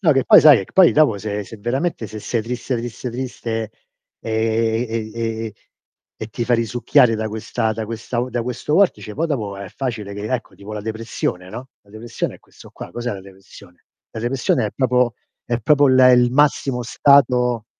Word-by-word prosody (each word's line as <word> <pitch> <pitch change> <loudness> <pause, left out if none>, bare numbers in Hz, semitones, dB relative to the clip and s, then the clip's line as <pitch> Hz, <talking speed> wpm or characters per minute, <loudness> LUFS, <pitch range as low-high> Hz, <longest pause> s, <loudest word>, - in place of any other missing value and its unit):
No 165 -7 +4
che 135 -1 +1
poi - - +8
sai, 150 -5 +8
ehm, 95 - -4
che - - -22
poi 185 -3 +6
dopo 145 -9 +3
se 105 0 -4
se 110 - -11
veramente 120 +3 -2
se 110 - -8
sei 115 +1 -2
triste, 125 +2 -3
triste, 120 +1 -5
triste, 115 -3 -4 0.5
ehm, 115 - -6
e 110 0 -1
e 115 -1 -3
ehm, 110 - -5 0.7
e 110 - -3
ti 120 +2 -4
fa 120 +1 +2
risucchiare 115 0 +2
da 110 0 -3
questa 110 0 -2
da 110 0 -4
questa 115 +2 -4
u 125 - -3
da 120 -2 -2
questo 125 +5 -3
vortice 180 - +2
poi 165 +3 -1
dopo 105 -10 -3
è 100 -1 -8
facile 110 -5 -5
che 105 +1 -6
ecco 125 - -4
tipo 100 +2 -10
la 105 - -4
depressione, 110 -4 -4
no, 125 +5 -8
la 100 - -24
depressione 115 +2 -5
è - - -26
questo - - -17
qua. - - -10
Cos'è 120 -1 -4
la 95 - -7
depressione? 95 -2 -17 0.3
La 110 - -7
depressione 120 -2 0
è 105 - -5
proprio 125 -2 +1 0.3
è 120 -1 -1
proprio 145 +4 +4
il 130 0 +4
e 125 0 +7
il 125 0 +4
massimo 135 -2 +1
stato 125 -3 +3
115 Hz, 205 wpm, -20 LUFS, 110-125 Hz, 0.7 s, poi